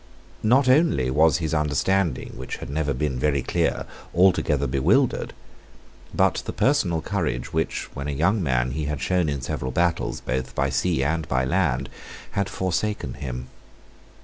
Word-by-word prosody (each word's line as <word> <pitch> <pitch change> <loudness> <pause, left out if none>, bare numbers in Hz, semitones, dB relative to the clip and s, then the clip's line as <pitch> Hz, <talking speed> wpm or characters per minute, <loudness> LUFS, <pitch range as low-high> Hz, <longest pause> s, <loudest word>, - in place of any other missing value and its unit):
Not 130 +5 +4
only 130 - +3
was 80 +4 +4
his 80 -2 -2
understanding, 75 +2 0
which 65 - -5
had - - -8
never 75 0 0
been 65 -1 -1
very 70 -1 +1
clear, - - 0 0.3
altogether 85 -6 +3
bewildered: 65 0 +2 0.8
but - - +2
the - - -1
personal 90 - +1
courage 60 - -2
which, - - -1
when 70 +1 -5
a - - -1
young 90 +9 +1
man, 65 -5 +1
he 75 +3 -3
had 75 -1 -3
shown 90 +3 +1
in 70 -2 -2
several 65 0 -3
battles, 85 +5 0
both 65 0 -3
by 70 0 +1
sea 65 +2 +1
and 80 +2 -1
by 65 0 +1
land, 70 -4 +1 0.4
had 100 -1 -1
forsaken 95 - -2
him. 65 -1 -6
75 Hz, 155 wpm, -24 LUFS, 65-90 Hz, 0.8 s, Not